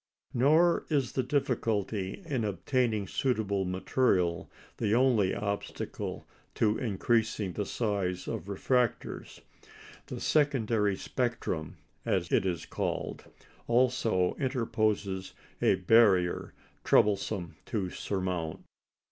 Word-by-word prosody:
Nor 155 +7 +4
is 140 -5 +1
the 130 - 0
difficulty 115 - -1
in 135 -8 -1
obtaining 110 +1 0
suitable 105 -7 0
material 90 -2 +1 0.3
the 110 -1 +1
only 120 -7 +3
obstacle 100 0 -4 0.3
to 110 -1 +2
increasing 110 -3 0
the 105 +1 -3
size 100 -5 -2
of 80 - -4
refractors. 120 +4 -1 0.7
The - - -6
"secondary 115 -9 +2
spectrum," 115 - -3 0.3
as - - 0
it 95 - +3
is 85 -3 -2
called, - - -3 0.4
also 120 -6 +2
interposes 110 -7 -1 0.3
a - - +4
barrier 95 -3 +3 0.3
troublesome 100 -5 +2
to 100 -7 -2
surmount. 90 -5 -3
105 Hz, 95 wpm, -30 LUFS, 95-125 Hz, 0.7 s, Nor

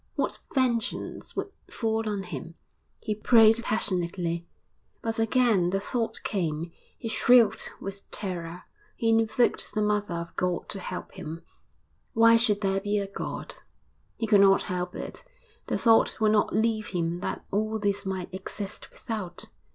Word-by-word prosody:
What - - -1 0.2
vengeance 245 -4 -1
would 400 - -3 0.2
fall 225 -1 -1
on 200 -2 -2
him? 170 -2 -7 0.5
He 215 - -1
prayed 225 +1 +6
passionately. 175 -5 -1 0.6
But 225 0 -1
again 225 -5 +3
the 195 +2 0
thought 230 +3 -2
came; 165 -4 -2 0.3
he 230 - -6
shrieked 225 0 +4
with 195 0 -8
terror, 175 -3 -4 0.3
he 230 -3 0
invoked 225 +2 +2
the 215 - +1
Mother 210 -3 0
of 170 0 -6
God 180 -1 -1
to 195 - -4
help 180 -1 -6
him. 165 -2 -7 0.7
'Why 230 0 +6
should 220 -3 +3
there 195 -1 +1
be 205 +1 0
a 200 - 0
God?' 195 - -6 0.6
He 230 - -1
could 205 -2 +5
not 195 -1 +6
help 180 0 -3
it. - - -7 0.4
The - - 0
thought 225 -1 +4
would 215 -1 +4
not 215 -1 +2
leave 220 -1 +1
him 170 -1 -2
that - - -4
all 215 +2 0
this 200 -1 0
might 190 -2 -4
exist 190 +1 -6
without. 210 -6 -5
205 Hz, 150 wpm, -27 LUFS, 180-225 Hz, 0.7 s, prayed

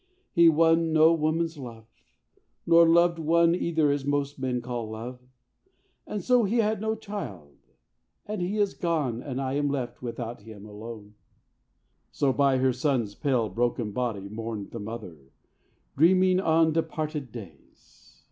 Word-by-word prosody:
he 170 -2 +6
won 165 +1 +3
no 160 +1 +6
woman's 160 0 -1
love, 115 -4 -9 0.8
Nor 170 0 +6
loved 170 0 +4
one 170 +1 +3
either 160 -4 +1
as 140 -1 -1
most 145 0 -1
men 130 -2 -1
call 120 -2 -5
love, 120 +3 -7 0.9
And 210 - -4
so 250 -2 +4
he 215 +4 0
had 215 -2 +1
no 220 0 -1
child 145 - -8 0.7
and 210 -2 -4
he 190 +4 -2
is 205 -2 +1
gone 150 -9 -1
And 135 -2 -5
I 135 -1 -2
am 145 0 0
left 130 -4 -4
without 120 -2 -6
him 105 -1 -12
and 105 - -12
alone." 105 0 -9 1.0
So 135 -2 0
by 140 -1 +3
her 130 0 +2
son's 125 -5 -1
pale 125 -3 0
broken 115 +1 -1
body 110 -4 -3
mourned 110 -1 -6
The 115 - -6
mother, 105 -5 -7 0.8
dreaming 185 +4 +4
on 160 -3 +3
departed 155 -4 -3
days. 95 - -14
140 Hz, 150 wpm, -27 LUFS, 115-165 Hz, 1.0 s, he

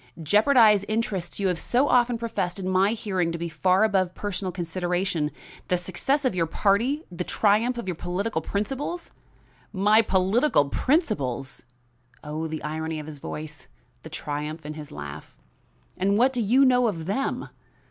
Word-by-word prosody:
"Jeopardize 210 - +5
interests 215 -6 -2
you 200 - +1
have 180 -3 0
so 255 +4 +2
often 245 -2 +3
professed 210 -6 -2
in 190 -1 -4
my 190 +3 +3
hearing 190 -6 -1
to 170 - -3
be 170 +1 -3
far 185 +5 +2
above 190 -4 +1
personal 195 -2 -3
consideration 175 -2 -1 0.4
the 180 - +2
success 190 - -1
of 255 - +2
your 170 -2 0
party, 230 - +1
the 180 0 -3
triumph 220 +6 +2
of 235 - -5
your 180 - -1
political 180 +6 -2
principles?" 270 +11 -3 0.6
"My 210 +3 +4
political 190 - +2
principles!" 140 - -1 0.6
Oh, 155 +2 -4
the 155 0 -5
irony 160 +1 -3
of 150 - -7
his 150 -2 -9
voice, 155 +2 -7 0.3
the - - -10
triumph 150 +2 -5
in 150 - -5
his 150 -1 -9
laugh! 75 +1 -9 0.6
"And 200 +2 +1
what 255 +4 +4
do 245 - -1
you 250 +6 +4
know 250 -1 +4
of 165 -7 -3
them? 205 +10 -2
190 Hz, 160 wpm, -25 LUFS, 165-225 Hz, 0.6 s, Jeopardize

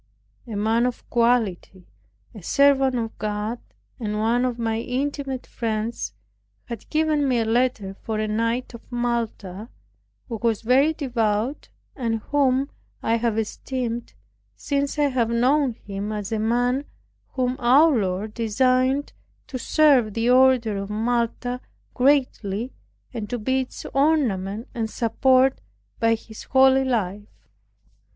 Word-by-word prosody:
A 225 - -5
man 225 +4 +2
of 250 - -6
quality, 225 -6 +1 0.5
a 210 - -10
servant 270 +5 +3
of 225 -2 -3
God, 215 +2 -2 0.4
and 210 -3 -2
one 230 +3 +2
of 245 -2 -2
my 225 -1 -1
intimate 270 +2 -3
friends 220 - -3 0.5
had 235 -3 -8
given 310 -2 +1
me 255 -2 +2
a 225 - +1
letter 225 -4 0
for 215 +2 -5
a 215 0 -1
knight 230 +4 -1
of 235 - -9
Malta, 230 -4 -3 0.6
who 230 - -4
was 230 -2 0
very 265 +6 +4
devout, 240 -4 -1 0.3
and 230 -4 -1 0.2
whom 275 -1 +2 0.3
I 225 +1 +2
have 230 -1 0
esteemed 235 +1 -3 0.4
since 280 +1 -2
I 290 -1 +3
have 245 -4 0
known 255 +3 +2
him, 205 -1 -6
as 210 0 -4
a 220 - 0
man 245 +5 +1 0.5
whom 255 -1 0
our 275 +6 +6
Lord 200 0 -1
designed 255 +5 +1 0.3
to 255 - -6
serve 260 -8 +3
the 230 +2 +2
order 250 -5 +4
of 195 0 -5
Malta 240 +3 -1 0.3
greatly, 250 -4 +1 0.4
and 220 -4 -5
to 245 - -2
be 260 +4 0
its 255 - -8
ornament 235 -8 +1
and 225 -2 -2
support 255 +4 +2 0.4
by 230 -1 +3
his 220 0 -11
holy 265 0 +5
life. 210 -5 -3
235 Hz, 135 wpm, -23 LUFS, 220-260 Hz, 0.6 s, our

